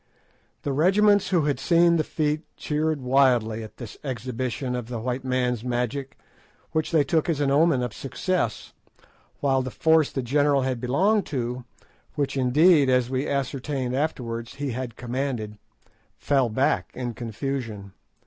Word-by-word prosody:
The 140 - -1
regiments 195 +6 +4
who 180 -4 +3
had 145 -3 0
seen 170 +3 +4
the 155 - +1
feat 150 0 -1 0.2
cheered 155 -1 -1
wildly 125 -4 +2
at 110 - -10
this 120 -4 -9
exhibition 125 0 -3
of 120 -2 -4
the 120 -1 -4
white 125 +3 -3
man's 125 -3 0
magic, 125 +3 -3 0.5
which 155 -1 0
they 160 -3 +3
took 155 +4 0
as 155 -4 0
an 140 -2 +1
omen 145 -3 +3
of 120 -3 -4
success, 135 - -2 0.7
while 135 -2 +2
the 130 - -4
force 160 +2 +3
the 135 - -3
general 140 +2 +2
had 130 -2 -2
belonged 190 - +2
to—which, 130 +2 -5
indeed, 140 +3 +4
as 125 -1 +2
we 130 +2 -1
ascertained 135 -1 -2
afterwards, 120 -6 -3
he 145 -1 -3
had 120 -1 -5
commanded—fell 125 +1 -3
back 130 +5 +1
in 125 -2 -4
confusion. 115 -4 -5
130 Hz, 145 wpm, -25 LUFS, 125-150 Hz, 0.7 s, regiments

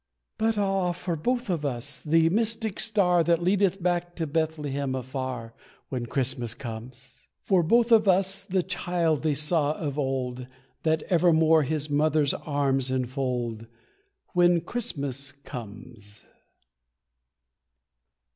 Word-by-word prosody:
But 220 0 +1
ah, 195 -3 +1
for 175 0 -3
both 245 +10 -1
of 170 -6 -1
us 125 -4 -2
the 165 +1 +3
mystic 220 +1 0
star 185 -6 +3
That 170 +1 +1
leadeth 195 0 +1
back 175 -1 -1
to 165 - -2
Bethlehem 145 -3 -2
afar, 130 -3 -5 0.4
When 125 -3 -4
Christmas 120 -2 0
comes. 125 +2 -9 0.2
For 190 -3 +3
both 235 +8 +3
of 215 -2 +5
us 190 +1 +3
the 190 -2 0
child 175 -4 -1
they 155 -2 0
saw 150 0 +1
of 150 -2 -4
old, 130 -2 -2 0.3
That 160 -1 +1
evermore 160 -2 +4
his 150 +1 -2
mother's 150 0 +2
arms 135 -3 0
enfold, 125 -3 -2 0.7
When 175 -1 +4
Christmas 140 - -3
comes. 110 -5 -11
155 Hz, 120 wpm, -26 LUFS, 130-180 Hz, 0.7 s, of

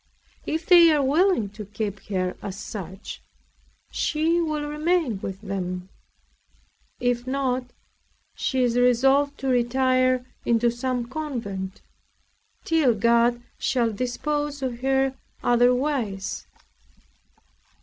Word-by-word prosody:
If 320 +1 -2
they 345 -2 +8
are 295 -2 +3
willing 295 - +2
to 210 +2 -9
keep 205 0 -4
her 185 -2 -1
as 195 -1 -6
such, 190 -1 -7 0.7
she 325 +3 +1
will 305 -2 -2
remain 300 - 0
with 190 0 -5
them; 185 -2 -4 1.1
if 245 0 0
not, 260 -1 0 0.7
she 260 -2 0
is 240 -1 +1
resolved 270 +4 +3
to 270 - -2
retire 255 0 +2 0.2
into 235 0 +2
some 245 0 -2
convent, 230 -9 -5 0.8
till 305 -8 +3
God 235 +2 +3 0.2
shall 235 -3 +1
dispose 290 +5 -2
of 245 -2 -3
her 270 0 +1 0.3
otherwise. 245 -4 +1
250 Hz, 105 wpm, -25 LUFS, 225-285 Hz, 1.1 s, they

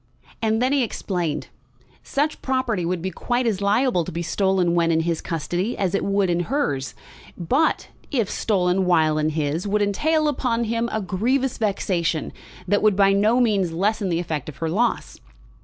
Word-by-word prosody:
And 220 +1 +1
then 260 +2 +2
he 280 - +3
explained. 180 -9 -3 0.5
Such 295 +2 -1
property 255 -9 -1
would 175 -1 -2
be 190 - -2
quite 245 +4 -1
as 210 -4 0
liable 205 -1 +2
to - - -6
be 170 +2 -3
stolen 190 -1 +1
when 170 -1 +2
in 160 0 +2
his 165 0 -1
custody 175 +7 -2
as 190 -2 -1
it 200 - 0
would 200 -1 +1
in 175 -1 +1
hers; 145 - -2 0.4
but 265 - +1 0.2
if 235 -8 0
stolen 185 -3 +1
while 160 -3 +3
in 155 0 +1
his 155 +4 -2
would 205 +1 +1
entail 305 +10 +1
upon 250 -5 0
him 230 +1 -1
a 220 - -1
grievous 245 +9 0
vexation 180 -6 -1 0.3
which 205 +3 +2
would 215 -2 +3
by 195 0 +4
no 215 +5 +3
means 200 -8 +1
lessen 200 +3 0
the 170 - 0
effect 155 -4 -4
of 145 - -10
her 165 - -2
loss. 230 +6 -1
195 Hz, 180 wpm, -23 LUFS, 170-230 Hz, 0.5 s, by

